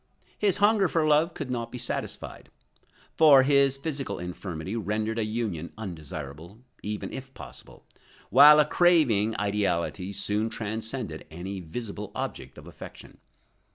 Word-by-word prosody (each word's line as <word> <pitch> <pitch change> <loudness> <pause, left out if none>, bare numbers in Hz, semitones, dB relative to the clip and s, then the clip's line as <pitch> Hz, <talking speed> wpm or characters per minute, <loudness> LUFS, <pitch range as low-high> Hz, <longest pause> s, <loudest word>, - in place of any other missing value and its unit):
His 200 -3 +2
hunger 205 -1 +4
for 165 -1 +1
love 155 +3 +3
could 140 -5 -5
not 120 -2 -3
be - - -6
satisfied, - - -5 0.7
for 145 -4 +7
his 140 -1 +3
physical 140 -1 -4
infirmity 90 +1 -6
rendered 110 +1 -2
a - - +1
union 105 -7 -3
undesirable, 80 -2 -8 0.2
even 105 0 -5
if 135 0 -8
possible, - - -12 0.5
while 150 +4 +9
a 150 - +5
craving 140 - +3
ideality 100 -2 -1
soon 105 +3 -1
transcended 110 -4 -5
any 95 +4 -6
visible 105 +3 -7
object - - -5
of - - -12
affection. - - -12
110 Hz, 130 wpm, -27 LUFS, 95-140 Hz, 0.7 s, while